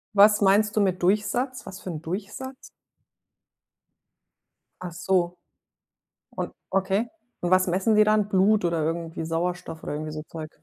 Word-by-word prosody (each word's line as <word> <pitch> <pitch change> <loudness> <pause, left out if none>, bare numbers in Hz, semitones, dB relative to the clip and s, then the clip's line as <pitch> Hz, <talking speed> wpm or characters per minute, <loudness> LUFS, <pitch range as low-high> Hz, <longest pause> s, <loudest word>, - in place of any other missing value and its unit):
Was 210 +1 +6
meinst 205 +2 +4
du 215 - +3
mit 185 -2 +1
Durchsatz? 215 +7 0
Was 190 - -8
für - - -7
'n 160 -3 -5
Durchsatz? 200 +10 -5 2.3
Ach 180 - -5
so. 175 +1 0 0.9
Und - - -4 0.2
okay. 195 +4 +1 0.3
Und 175 - -1
was 185 0 +4
messen 190 +5 +2
die 215 - +7
dann? 215 -1 +3
Blut 200 0 +3
oder 170 -2 0
irgendwie 165 0 -3
Sauerstoff 165 0 -3
oder - - -4
irgendwie 155 +1 -4
so 155 0 -6
Zeug? 155 -2 -7
185 Hz, 145 wpm, -25 LUFS, 170-210 Hz, 2.3 s, die